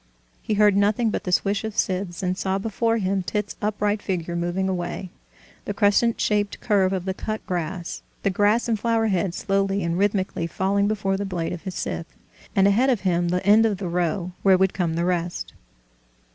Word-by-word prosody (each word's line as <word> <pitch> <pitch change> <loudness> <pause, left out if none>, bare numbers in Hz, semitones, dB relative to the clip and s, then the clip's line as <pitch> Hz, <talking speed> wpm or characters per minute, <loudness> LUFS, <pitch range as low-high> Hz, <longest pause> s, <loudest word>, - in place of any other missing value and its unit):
He 215 - -1
heard 205 -1 +5
nothing 210 +3 +2
but - - -3
the 180 - -2
swish 200 +3 +1
of 220 -1 -5
scythes, 185 -1 -1
and 185 0 0
saw 190 0 -1
before 225 +3 0
him 195 -2 0
Tit's 210 +2 -3
upright 210 0 0
figure 175 -3 -3
mowing 175 +2 -1
away, 180 0 -3 0.5
the 205 - -3
crescent 210 +3 +3
shaped 205 -1 0
curve 195 -4 +2
of 185 -2 -2
the 190 - -1
cut 215 +3 -5
grass, 175 0 -4 0.2
the 200 - +2
grass 205 +5 +2
and 225 -3 0
flower 225 0 +1
heads 185 -2 0
slowly 195 0 0
and 170 +1 -1
rhythmically 195 -4 0
falling 200 +4 +1
before 195 -2 0
the 200 - -2
blade 180 -4 -3
of 175 +2 -8
his 185 -2 -5
scythe, 165 - -4 0.4
and 195 0 +5
ahead 235 +7 +3
of 240 -7 +1
him 175 -2 +1
the 180 +1 -1
end 210 +2 +6
of 215 -3 +1
the 190 -1 -4
row, 175 +1 -1
where 190 -1 +5
would 190 0 +2
come 170 -4 -1
the 170 +1 0
rest. 175 -1 -2
195 Hz, 200 wpm, -24 LUFS, 180-205 Hz, 0.5 s, end